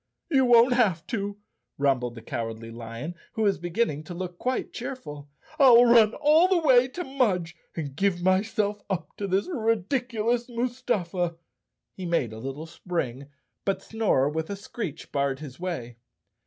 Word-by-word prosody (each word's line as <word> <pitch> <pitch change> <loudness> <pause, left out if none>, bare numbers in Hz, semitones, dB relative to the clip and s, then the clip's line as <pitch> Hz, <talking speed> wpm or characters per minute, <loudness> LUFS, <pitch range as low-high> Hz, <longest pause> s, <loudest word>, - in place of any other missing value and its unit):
"You 265 -3 +4
won't 240 +1 +6
have 200 -9 +2
to," 200 -2 -2 0.4
rumbled 125 -4 +1
the 115 - -10
Cowardly 115 -2 -5
Lion, 115 +7 -6 0.2
who 220 - -1
was 200 -2 +2
beginning 175 -3 -1
to 175 - -7
look 180 0 -6
quite 255 0 -2
cheerful. 155 - -7 0.3
"I'll 245 -3 +8
run 230 -2 +6
all 310 +4 +5
the 375 -1 +3
way 260 -6 +5
to 350 +7 -5
Mudge 205 - 0 0.2
and 145 -5 -5
give 195 -1 0
myself 205 +2 +1
up 185 -3 -3
to 200 - -3
this 195 +1 +1
ridic¬ 235 - 0
ulous 235 +3 0
Mustafa. 230 -8 -1 0.6
He 185 -2 -6
made 145 -10 0
a 110 - -8
little 135 +6 -6
spring, 160 -6 -4 0.4
but 195 - -1
Snorer 215 -12 +1
with 160 +2 -3
a 200 - -3
screech 195 - -7
barred 140 -1 0
the 140 -3 -9
way. 140 -10 -5
190 Hz, 160 wpm, -26 LUFS, 150-235 Hz, 0.6 s, I'll